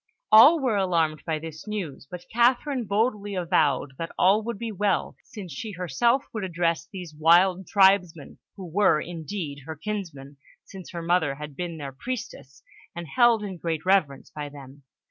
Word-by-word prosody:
All 270 +10 +8
were 250 -7 0
alarmed 165 -5 0
by 160 -1 0
this 155 +3 -9
news, 175 -11 -5
but 180 0 -9
Catherine 245 +2 +2
boldly 205 -1 -1
avowed 155 -6 +1
that 165 0 -4
all 195 +4 +4
would 230 0 -5
be 230 +1 -5
well, 205 0 -1
since 190 -7 -9
she 210 +9 -6
herself 190 - +1
would 220 -3 -4
address 170 -2 -1
these 180 -4 -9
wild 175 +4 +3
tribesmen, 190 -6 +2 0.2
who 190 - -8
were, 180 -1 +2
indeed, 165 -2 -6
her 160 - -5
kinsmen, 155 -7 -6 0.3
since 190 -2 -11
her 170 -1 -6
mother 165 -5 +1
had 150 0 -9
been 170 +1 -5
their 140 -3 -6
priestess 140 - -7 0.3
and 170 0 -6
held 240 -3 +4
in 190 -3 -6
great 165 -1 -3
reverence 185 -8 +1
by 150 -1 -6
them. 140 0 -13
180 Hz, 165 wpm, -25 LUFS, 155-205 Hz, 0.3 s, All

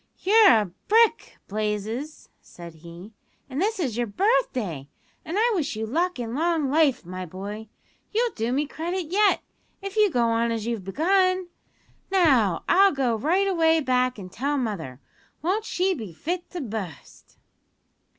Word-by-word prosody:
"You're 430 +2 +5
a 210 -6 +3 0.2
brick, 455 +1 +3
Blazes," 215 +7 -4
said 170 -1 -12
he, 170 +6 -12 0.3
"and 275 +3 -4
this 430 +1 0
is 255 -10 -2
your 240 -1 0
birthday, 215 - 0 0.3
an' 340 +5 -4
I 470 +3 +3
wish 310 - -1
you 220 +1 -3
luck 335 +6 -1
an' 230 -1 -4
long 315 -1 0
life, 295 - +2
my 185 +1 -6
boy. 200 +5 -7 0.4
You'll 465 +2 +1
do 225 +2 -2
me 285 +4 +1
credit 340 +3 -4
yet, 410 +1 +3 0.4
if 395 0 -7
you 425 -1 +5
go 245 -8 +1
on 230 0 +1
as 225 -2 -3
you've 230 -4 -3
begun. 370 - +1 0.6
Now, 265 - +3
I'll 390 +2 +5
go 260 -4 0
right 345 - +1
away 325 -3 +3
back 255 -3 +1
an' 185 -3 -8
tell 280 +9 -2
mother. 180 - -4 0.4
Won't 400 +6 0
she 375 -1 0
be 220 - -7
fit 345 - -4
to 355 - -6
bu'st?" 210 - -8
270 Hz, 160 wpm, -25 LUFS, -, 0.6 s, You're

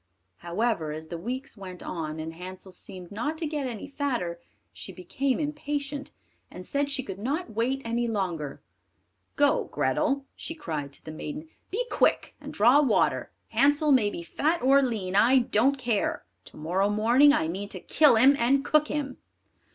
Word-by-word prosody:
However, 175 - -1
as 155 +1 -7
the 170 - -4
weeks 255 +8 -5
went 185 -3 -9
on, 160 -2 -4
and 160 +1 -5
Hansel 185 +2 -9
seemed 180 0 -9
not 240 +10 -3
to 325 - -3
get 295 -3 -2
any 235 0 -6
fatter, 245 -12 -2 0.3
she - - -8
became 245 +10 -2
impatient, 290 -1 -3 0.4
and 180 - -9
said 285 0 -1
she 275 -2 -1
could 195 -3 -7
not 280 - -2
wait 255 +5 -1
any 235 +1 0
longer. 175 -10 -3 0.7
"Go, 290 0 +3
Grethel," 280 -2 0
she 325 - -5
cried 155 - -4
to - - -13
the 155 - -6
maiden, 295 - -7 0.2
"be 470 +6 -1
quick - - +2
and - - -8
draw 245 +8 +5
water; 255 -7 +1 0.2
Hansel 290 +2 +3
may 235 -6 +4
be 170 - -6
fat 315 - -1
or 275 +2 +6
lean, 210 -8 -2
I 240 +6 +6
don't 255 +3 +2
care, 235 - -1 0.2
to - - -15
morrow 180 +6 0
morning 235 +7 +5
I 160 - +1
mean 195 +5 -4
to - - -7
kill 300 -6 +4
him, 260 +5 +6
and 270 +4 +2
cook 305 0 +3
him!" 285 -3 -3
240 Hz, 175 wpm, -27 LUFS, 185-280 Hz, 0.7 s, or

